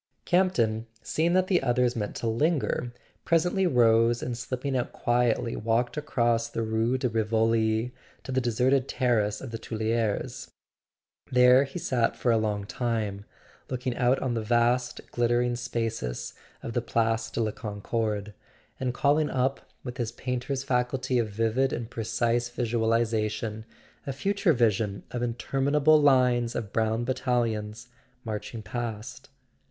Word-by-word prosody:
Campton, 115 - +2 0.2
seeing 165 +2 +1
that 185 0 +4
the 185 -1 +2
others 125 -1 +1
meant 105 -3 -3
to - - -4
lin¬ 145 +9 +2
ger, 125 -1 -2 0.3
presently 175 +3 +2
rose 115 -4 +4
and 120 - -3
slipping 130 +3 -3
out 125 - -1
quietly 120 -1 +1
walked 115 +2 0
across 120 -6 0
the 115 -1 -2
Rue 110 +3 +1
de 130 - 0
Rivoli 110 +1 +1 0.3
to 130 - -6
the 130 0 +1
deserted 125 +3 +2
terrace 110 -5 +1
of 130 - -7
the 115 - -5
Tuileries. 110 -1 -2 0.8
There 125 +1 +6
he 135 - -8
sat 120 -3 0
for 120 - +1
a 115 - +4
long 105 -2 -1
time, 105 -3 -2 0.4
looking 125 -1 -2
out 125 +1 +3
on 130 -2 0
the 115 - -1
vast 120 +2 +1
glittering 120 0 +1
spaces 115 - -3 0.3
of 115 - -5
the 120 - 0
Place 115 -1 0
de 115 - -4
la 110 -2 +1
Concorde, 105 -1 -3 0.5
and 125 -1 -2
calling 150 +3 +2
up, 130 +1 0 0.2
with 125 0 -6
his 120 -3 -2
painter's 130 +1 -3
faculty 125 -1 0
of 115 -2 0
vivid 115 +5 +1
and 120 0 -4
precise 120 +1 0
visualization, 110 -2 -1 0.4
a 135 - -2
future 195 +4 +1
vision 110 -5 +1
of 120 - -3
interminable 140 +6 +2
lines 125 -4 +3
of 105 -3 -4
brown 110 +1 +1
battalions 120 -3 -1 0.4
marching 105 0 -5
past. 115 -2 -6
120 Hz, 145 wpm, -27 LUFS, 110-130 Hz, 0.8 s, There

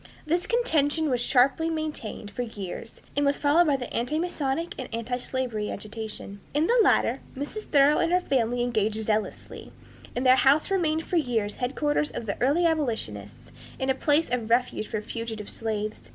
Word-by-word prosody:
This 340 +3 0
contention 315 - +2
was 245 -1 +1
sharply 270 +6 +3
maintained 305 -10 -4
for 245 - -4
years, 220 -1 -7
and 285 - +2
was 280 0 +2
followed 315 +4 +4
by 290 - +3
the 255 -2 -3
antimasonic 305 +3 -1
and 255 - -5
antislavery 240 -1 -3
agitation. 215 -1 -7 0.2
In 300 +2 +3
the 480 +6 +3
latter 270 - +3 0.2
Mrs. 295 +10 -4
Thoreau 285 +1 +4
and 335 - +1
her 360 - +4
family 245 -7 0
engaged 220 -3 0
zealously, 215 0 -3 0.4
and 250 +2 -1
their 255 0 +7
house 285 +8 +4
remained 325 -4 +1
for 355 - 0
years 230 -8 0
headquarters 295 +4 0
for - - -5
the 215 -3 -5
early 290 +8 +3
abolitionists 120 - -2 0.3
and 265 0 +1
a - - +3
place 295 +4 +2
of 235 -3 -1
refuge 240 -2 +1
for 215 - -3
fugitive 220 -1 -6
slaves. 215 -1 -3
260 Hz, 165 wpm, -26 LUFS, 225-305 Hz, 0.4 s, their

